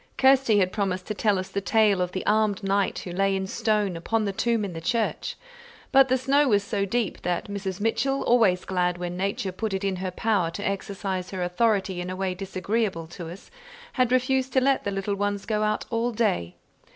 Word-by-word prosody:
Kirsty 265 -4 +5
had 185 -2 +2
promised 185 -3 -2
to - - 0
tell 210 -1 +1
us 185 +1 -4
the 200 +1 -2
tale 205 -2 +3
of 180 0 -1
the 185 - -4
armed 210 -1 +2
knight 195 0 +1
who 180 - -6
lay 195 +2 +1
in 190 0 -2
stone 210 -2 0
upon 215 +6 -1
the 200 - -2
tomb 230 +1 0
in 190 - -6
the 165 - -6
church; 225 +6 -1 0.6
but 270 -1 +6
the 260 0 +2
snow 275 +3 +3
was 205 -4 +3
so 200 -1 -1
deep, 225 0 -2
that 175 -1 -1
Mrs. 195 -2 -4
Mitchell, 230 +6 0
always 215 -7 +3
glad 180 -1 0
when 175 0 -4
nature 195 +2 -2
put 200 +2 -3
it 190 - -3
in 195 -2 -1
her 185 +1 -3
power 195 -2 0
to 200 +5 -4
exercise 195 -1 -3
her 185 -2 -3
authority 190 0 +1
in 180 - -5
a 185 - -4
way 190 -1 -1
disagreeable 190 0 -2
to 170 -1 -8
us, 180 +4 -11 0.4
had 255 -2 +2
refused 260 +1 +1
to 260 - +5
let 270 +1 +2
the 200 - 0
little 195 +1 -2
ones 200 0 -2
go 215 -2 0
out 215 0 0
all 230 +1 0
day. 205 - 0
200 Hz, 215 wpm, -25 LUFS, 185-225 Hz, 0.6 s, but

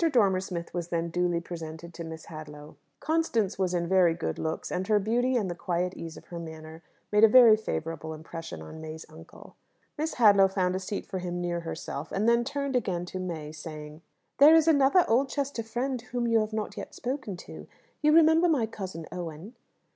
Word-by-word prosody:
Dormer 200 -8 +3
Smith 175 -3 -6
was 175 -1 -3
then 170 -1 -2
duly 175 0 0
presented 170 0 -8
to 170 - -7
Miss 160 -1 -8
Hadlow. 150 -1 -10 0.2
Constance 240 - 0
was 180 -1 +1
in 170 -1 0
very 180 -2 +4
good 165 - -3
looks, 160 0 -3
and 185 +1 -2
her 215 - +4
beauty 240 +5 +1
and 215 -5 +1
the 175 - -3
quiet 180 +1 -2
ease 165 -1 -8
of - - -13
her 170 - -6
manner 160 0 -9 0.3
made 210 +1 +4
a - - +11
very 230 -1 +8
favourable 160 -6 -4
impression 155 - -8
on 120 - -10
May's 160 0 -8
uncle. 160 +1 -14 0.4
Miss 315 +1 -2
Hadlow 200 -5 +6
found 185 -1 0
a - - -1
seat 195 +2 -5
for 190 -2 -4
him 175 -1 -4
near 175 -1 -2
herself; 165 -2 -6
and 205 +3 0
then 235 0 +4
turned 280 +1 -3
again 180 -8 -1
to 185 +1 -6
May, 165 -5 -5
saying, 155 0 -9 0.4
"There 300 +3 +9
is 325 -1 +4
another 290 +3 +5
Oldchester 270 +1 0
friend 245 +3 -3
whom 245 0 -3
you 230 -1 +4
have 215 0 -1
not 215 -1 -4
yet - - -7
spoken 250 -7 -4
to. - - -10 0.3
You 300 0 +4
remember 325 +2 +5
my 275 -8 +2
cousin 185 -7 -7
Owen?" 175 +4 -7
185 Hz, 200 wpm, -28 LUFS, 165-235 Hz, 0.4 s, a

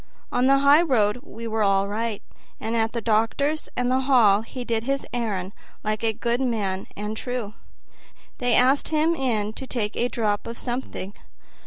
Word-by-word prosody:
On 245 +1 +2
the 275 0 +6
highroad 275 -7 +4
we 230 -1 -8
were 220 0 -1
all 195 -1 +3
right; 220 +1 -3 0.4
and 225 +2 -2
at 225 -1 +1
the 235 - -3
doctor's 230 +8 +1
and 250 0 +1
the 260 - +3
hall 240 -7 +5
he 245 +3 -7
did 225 -1 -1
his 275 +1 -1
errand 205 -6 -2 0.3
like 215 0 -2
a 225 - +3
good 235 +3 -1
man 205 -7 -1
and 210 +1 -4
true. 245 -3 -4 0.9
They 245 -2 +2
asked 265 +3 +4
him 315 +1 +2
in 225 -8 -1
to 265 - -8
take 220 -5 -2
a 240 - +1
drop 210 -4 -1
of 230 0 -6
something. 240 -6 -4
230 Hz, 175 wpm, -24 LUFS, 215-255 Hz, 0.9 s, the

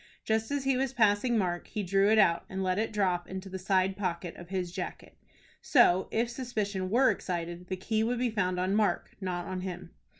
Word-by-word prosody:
Just 220 0 0
as 285 -1 -1
he 270 -1 +2
was 265 0 -1
passing 225 0 +3
Mark, 175 -4 -1
he 210 -2 -3
drew 195 +2 +3
it 220 - +5
out 170 -5 +4
and 190 0 -3
let 185 +1 0
it 220 +1 -1
drop 185 -4 0
into 190 +1 -6
the 190 0 -5
side 190 0 +1
pocket 180 -3 -3
of 175 -1 -11
his 185 -2 -2
jacket. - - -6 0.5
So, 190 - +4
if 230 +2 0
suspicion 215 -6 -3
were 255 +6 +4
excited, 175 0 -4
the 185 - -3
key 220 +4 0
would 240 +2 0
be 245 -1 0
found 185 -4 0
on 185 +2 0
Mark, 210 0 +1
not 180 -2 -3
on 185 -1 -4
him. 180 -1 -6
195 Hz, 210 wpm, -30 LUFS, 180-220 Hz, 0.5 s, it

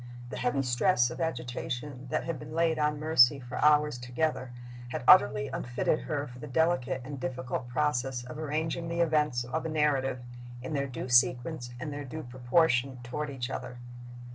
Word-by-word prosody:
The - - -5
heavy 130 +2 0
stress 120 0 +2
of 120 - -6
agitation 125 -2 -4
that - - -1
had 165 -4 -4
been 150 +1 -8
laid 165 -1 +2
on 150 0 +1
Mercy 145 -4 +5
for 125 -1 -5
hours 150 -3 +4
together 125 +1 -2 0.4
had 125 - -4
utterly 105 +1 +6
unfitted 125 +5 -1
her 145 -2 -3
for 125 -2 -11
the - - -7
delicate 135 -3 +1
and 140 0 -6
difficult 125 -1 -4
process 130 -2 0
of 125 +5 -8
arranging 160 +2 -2
the 170 +1 -1
events 150 -6 +2
of 125 +7 -3
a 160 - -3
narrative 145 -4 +1 0.5
in 155 - -5
their 140 -1 0
due 125 0 -6
sequence 125 +2 +2
and 150 +2 -5
their 145 0 -5
due 155 +4 -7
proportion 125 +1 +1
toward 150 +5 -4
each 130 -2 -4
other. 125 - -6
135 Hz, 175 wpm, -29 LUFS, 125-155 Hz, 0.5 s, utterly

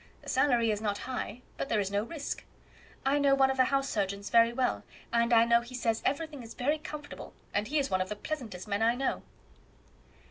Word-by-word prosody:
The - - -8
salary 240 -5 +3
is 210 0 -2
not 205 -2 -1
high, 250 -1 -5
but - - -3
there 215 - +2
is 195 -1 -1
no 200 0 +1
risk. 285 +6 -5 0.6
I 280 +2 +3
know 280 -1 +4
one 270 -1 +4
of 265 - -3
the 255 - +5
house 275 +1 +1
surgeons 200 -3 -2
very 230 0 +6
well, 250 +1 0 0.3
and 235 0 +3
I 230 -1 +6
know 235 0 +4
he 240 +2 -9
says 230 -2 0
everything 290 0 -2
is 230 -1 -10
very 295 +5 0
comfortable, 300 -1 -8 0.2
and 205 +1 0
he 300 - 0
is 280 -2 0
one 185 - +2
of 185 - -2
the 210 - -3
pleasantest 220 - -5
men 200 +1 -1
I 230 +2 +4
know." 270 +2 -1
240 Hz, 220 wpm, -30 LUFS, 215-275 Hz, 0.6 s, very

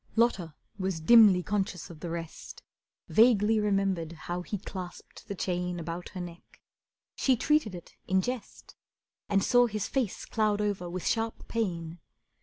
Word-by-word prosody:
Lotta 195 -9 +1 0.2
was 190 -3 -1
dimly 200 0 +7
conscious 195 -4 -2
of 160 - -12
the 170 - -5
rest, 165 -1 -7 0.4
Vaguely 220 -1 +5
remembered 195 -5 0
how 175 +2 -5
he 205 +3 -4
clasped 185 -2 -9
the 200 - -4
chain 180 -1 -2
About 170 +2 -5
her - - -4
neck. 175 -1 -10 0.6
She 265 - +3
treated 285 -8 +2
it 175 - -11
in 190 0 +2
jest, 250 -4 -6 0.5
And 195 -1 +3
saw 245 0 +5
his 215 -3 -3
face 255 -8 -2
cloud 215 -2 +1
over 200 -4 -1
with 180 0 -5
sharp 225 0 -1
pain. 175 -7 -3
190 Hz, 150 wpm, -29 LUFS, 175-215 Hz, 0.6 s, dimly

